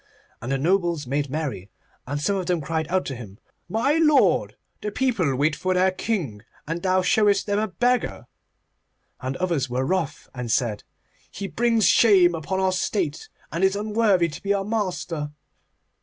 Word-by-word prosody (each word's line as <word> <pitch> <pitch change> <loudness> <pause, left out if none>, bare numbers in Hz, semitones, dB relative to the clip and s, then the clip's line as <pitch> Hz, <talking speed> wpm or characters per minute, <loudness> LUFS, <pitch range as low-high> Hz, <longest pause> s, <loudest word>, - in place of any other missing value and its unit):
And 120 +3 -4
the 135 - +1
nobles 170 0 +1
made 140 +2 -1
merry, 135 - -4 0.4
and 145 +2 -2
some 200 +7 0
of 185 -3 -3
them 180 -2 +1
cried 160 +1 -2
out 185 0 0
to 135 - -4
him, 105 -5 -10 0.3
'My 275 +8 +1
lord, 305 -2 +3 0.3
the 210 - -2
people 205 - +1
wait 150 +3 +1
for 185 0 -1
their 185 +1 +3
king, 180 - -3 0.3
and 165 +2 -3
thou 185 0 +2
showest 205 +1 +3
them 205 0 0
a 215 - 0
beggar,' 245 +4 0 0.9
and 130 +1 -4
others 170 -8 -1
were 130 +2 -1
wroth 155 -3 -2
and 125 -3 -4
said, 110 -4 0 0.5
'He 200 - -6
brings 230 0 +2
shame 190 -6 +5
upon 165 +4 -3
our 190 0 +2
state, 185 -4 -2 0.2
and 170 +4 -2
is 190 +1 +3
unworthy 210 -4 +2
to 155 +3 -9
be 200 0 +1
our 195 -1 -2
master. 180 -8 -2
180 Hz, 170 wpm, -24 LUFS, 145-200 Hz, 0.9 s, shame